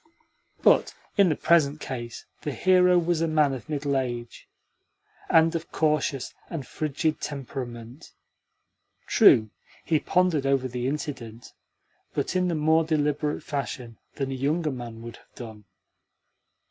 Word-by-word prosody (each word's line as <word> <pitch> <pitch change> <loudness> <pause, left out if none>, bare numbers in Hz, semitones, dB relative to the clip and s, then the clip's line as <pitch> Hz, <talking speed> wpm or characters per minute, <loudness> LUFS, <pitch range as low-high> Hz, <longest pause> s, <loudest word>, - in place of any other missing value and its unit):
But - - +4 0.2
in 200 -4 +5
the 155 - +1
present 155 -3 +3
case 120 -4 -6 0.2
the 150 - -3
hero 180 +1 +4
was 170 -1 +1
a 165 - +2
man 155 -3 +2
of 130 +4 -8
middle 145 -2 -1
age, 120 -3 -4 0.8
and 165 0 +5
of 165 -1 -4
cautious 150 -4 0 0.2
and 155 -6 -5
frigid 155 +3 -2
temperament. 125 -1 -7 0.9
True, 110 -2 +5 0.3
he 160 -2 +2
pondered 175 -7 +1
over 135 -1 +2
the 125 0 -3
incident, 125 -6 -5 0.6
but - - -2
in 180 0 +2
more 160 +2 +3
deliberate 150 -1 -1
fashion 130 -5 -5 0.2
than 135 -1 -3
a - - -2
younger 150 +4 0
man 120 -3 -7
would 115 0 -9
have - - -25
done. 110 -4 -10
145 Hz, 135 wpm, -26 LUFS, 125-160 Hz, 0.9 s, in